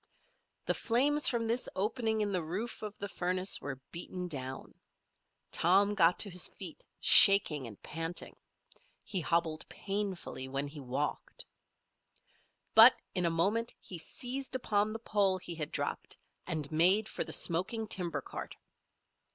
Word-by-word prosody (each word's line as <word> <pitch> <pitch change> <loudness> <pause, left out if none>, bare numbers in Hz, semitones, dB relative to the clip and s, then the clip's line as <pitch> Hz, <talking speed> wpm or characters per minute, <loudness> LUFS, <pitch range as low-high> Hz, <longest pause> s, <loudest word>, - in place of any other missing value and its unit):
The - - +1
flames 285 +6 +3
from 235 -2 0
this 235 +2 -1
opening 220 +2 -1
in 205 -1 -1
the 185 -2 -1
roof 190 +9 -5
of 210 -1 -7
the 200 - -5
furnace 185 0 0
were 140 -2 -6
beaten 180 +1 -6
down. 130 -5 -6 0.8
Tom 195 +4 +3
got 175 -3 +3
to 205 - +1
his 180 0 -1
feet, - - -8 0.2
shaking 160 - +7
and 105 -3 -12
panting. 165 +2 -5 0.7
He 190 -4 -1
hobbled 165 -1 -1
painfully 195 -9 -4
when 135 +1 -3
he 145 +1 -10
walked. 135 +2 -4 1.3
But 225 +3 +9 0.2
in 180 -2 0
a - - +2
moment 205 +8 0
he 180 - -7
seized 260 +9 -4
upon 215 -4 0
the 225 - -5
pole 205 -4 0
he 175 -1 -6
had 155 -3 -4
dropped - - -4 0.3
and 155 -4 -3
made 185 +7 +4
for - - -3
the - - -9
smoking 185 +6 -1
timber 170 -7 -2
cart. - - -8
185 Hz, 145 wpm, -31 LUFS, 165-215 Hz, 1.3 s, But